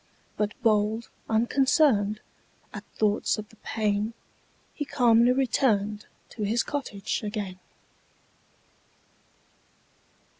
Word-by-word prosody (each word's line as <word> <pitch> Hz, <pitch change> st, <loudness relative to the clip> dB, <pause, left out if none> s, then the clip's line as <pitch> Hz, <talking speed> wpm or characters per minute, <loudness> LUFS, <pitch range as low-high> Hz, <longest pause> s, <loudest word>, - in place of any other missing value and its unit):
But 210 Hz, +1 st, -2 dB
bold, 215 Hz, +1 st, +1 dB, 0.2 s
unconcern'd 230 Hz, -2 st, +2 dB, 0.5 s
At -, -, -7 dB
thoughts 210 Hz, 0 st, +1 dB
of 215 Hz, 0 st, -6 dB
the -, -, -19 dB
pain, 215 Hz, +1 st, -1 dB, 0.6 s
He 295 Hz, -, -3 dB
calmly 245 Hz, -4 st, +4 dB
return'd 215 Hz, -5 st, +1 dB, 0.2 s
To 220 Hz, -, -9 dB
his 220 Hz, +3 st, +1 dB
cottage 245 Hz, -9 st, -3 dB
again. 205 Hz, -4 st, -5 dB
220 Hz, 85 wpm, -27 LUFS, 210-240 Hz, 0.6 s, calmly